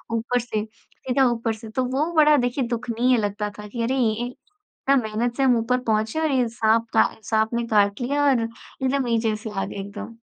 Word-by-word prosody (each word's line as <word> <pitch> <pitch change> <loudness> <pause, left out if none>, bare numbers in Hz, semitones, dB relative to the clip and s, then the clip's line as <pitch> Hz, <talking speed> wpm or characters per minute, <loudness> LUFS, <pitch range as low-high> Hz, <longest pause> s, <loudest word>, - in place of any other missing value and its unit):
ऊपर 245 +2 0
से, 220 -3 -3
सीधा 250 +4 -2
ऊपर 230 -1 -1
से। 220 0 -10
तो 255 +4 -1
वो 275 +6 -1
बड़ा 300 -1 +6
देखिए 245 +2 0
दुखनीय 240 +1 +1
लगता 210 0 -2
था 210 - -7
कि 230 +3 -5
अरे! 255 +3 0
इन 235 -1 +1
इतना 295 0 -4
मेहनत 230 +3 -2
से 275 - +2
हम 250 -3 +4
ऊपर 250 +2 +1
पहुँचे 220 +4 0
और 315 -2 +1
ये 255 -3 +2
साँप 225 0 +1
का 220 - +4
साँप 220 +1 0
ने 235 0 0
काट 205 0 +2
लिया 285 +4 0
और 255 -4 +3
एकदम 260 +4 -3
नीचे 225 -2 +1
से 215 +1 -7
आ 195 -2 -2
गए, - - -8
एकदम। 210 +3 -7
235 Hz, 210 wpm, -23 LUFS, 220-255 Hz, -, बड़ा